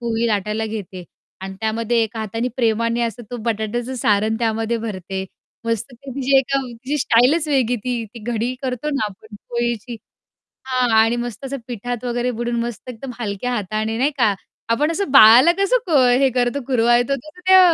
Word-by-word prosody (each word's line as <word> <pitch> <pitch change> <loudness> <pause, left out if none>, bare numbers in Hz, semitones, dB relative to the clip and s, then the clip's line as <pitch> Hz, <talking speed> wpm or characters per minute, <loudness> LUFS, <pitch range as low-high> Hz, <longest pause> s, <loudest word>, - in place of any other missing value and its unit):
पोळी 235 -1 -1
लाटायला 215 0 -1
घेते 200 -4 -6 0.4
आणि 190 0 -6
त्यामध्ये 230 +1 0
एका 225 +1 -4
हाताने 225 +3 -2
प्रेमाने 230 -1 +1
असं 235 +1 -3
तो 245 - -4
बटाट्याचं 230 +3 -2
सारण 215 -2 +1
त्यामध्ये 225 0 0
भरते. 190 -3 -5 0.4
मस्त 230 +2 -2
ते 265 +3 -11
तिची 270 +1 +1
एकदम 270 0 0
तिची 255 +5 -4
स्टाईलच 265 +6 +3
वेगळी 255 -4 +2
ती 245 -2 -2
ती - - -7
घडी 235 +3 -1
करतो 260 +3 -2
ना 270 - 0
आपण 210 +2 -15
पोळीची 235 0 -2 0.7
हां 255 -2 +1
आणि 225 +2 +3
मस्त 240 +1 -5
असं 275 +1 -4
पिठात 245 0 -5
वगैरे 245 +1 -1
बुडून 240 0 -2
मस्त 240 +1 -6
एकदम 250 +2 -7
हलक्या 215 +2 -3
हाताने 215 +1 -2
नाही 270 +5 +2
का? 220 -5 +3 0.4
आपण 290 +7 +2
असं 335 -3 -2
बाळाला 255 +4 +8
कसं 395 +6 +3
क 325 - +1 0.2
हे 270 -1 +4
करतो 245 +2 +1
कुरवाळतो 240 +1 +3
तसं 305 +6 -12
त्या 375 0 +8
235 Hz, 175 wpm, -20 LUFS, 220-255 Hz, 0.7 s, बाळाला